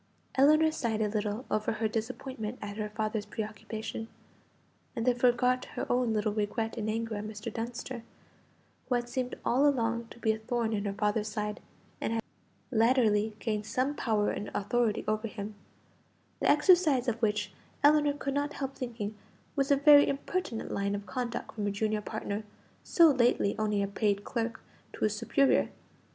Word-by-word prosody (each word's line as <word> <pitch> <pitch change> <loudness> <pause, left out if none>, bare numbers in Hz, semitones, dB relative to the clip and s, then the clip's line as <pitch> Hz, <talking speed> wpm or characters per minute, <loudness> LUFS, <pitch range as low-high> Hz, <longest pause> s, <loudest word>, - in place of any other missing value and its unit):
Ellinor 310 +4 +5
sighed 235 -8 -1
a - - +1
little 210 +3 -2
over 215 +1 +1
her 220 +1 0
disappointment 225 +1 -4
at 205 0 -6
her 210 -1 -2
father's 215 -1 -2
preoccupation, 220 +1 -5 0.9
and 230 - -2
then 250 - +5
forgot 250 +1 +2
her - - -2
own 245 -1 +2
little 215 -1 0
regret 220 +2 -1
in 215 -1 -2
anger 225 +1 -2
at 205 - -4
Mr. 215 +1 -6
Dunster, 240 +1 -5 0.9
who 250 - +3
had 240 0 -1
seemed 250 0 -3
all 270 +4 +4
along 235 -4 +1
to - - -13
be 225 -2 +2
a 220 - -3
thorn 230 0 -1
in 205 -1 -1
her 200 - -1
father's 210 +1 0
side, 210 -1 -3 0.4
and 225 - -1
had 225 -1 -1 0.5
latterly 220 -3 +3
gained 215 -2 -2
some 255 +5 0
power 215 -7 +1
and 205 - -4
authority 230 +1 +1
over 215 +1 0
him, 210 0 -6 0.9
the - - +2
exercise 300 -4 +5
of 235 -1 -1
which, 210 -3 +1 0.3
Ellinor 295 0 +5
could 280 -1 -3
not 290 +1 -1
help 270 -1 -4
thinking, 230 -5 -4 0.4
was 275 -2 +1
a 285 - +6
very 285 +1 +7
impertinent 280 -3 -2
line 200 0 0
of 200 0 -5
conduct 245 -1 -4
from 210 -2 -2
a - - +1
junior 215 +1 0
partner, 215 0 -4 0.4
so 335 -3 +6
lately 240 -6 +2
only 210 -2 +1
a - - 0
paid 200 0 0
clerk, 230 0 -3 0.3
to - - -5
his 215 -1 +2
superior. 235 +5 +3
225 Hz, 170 wpm, -30 LUFS, 210-255 Hz, 0.9 s, very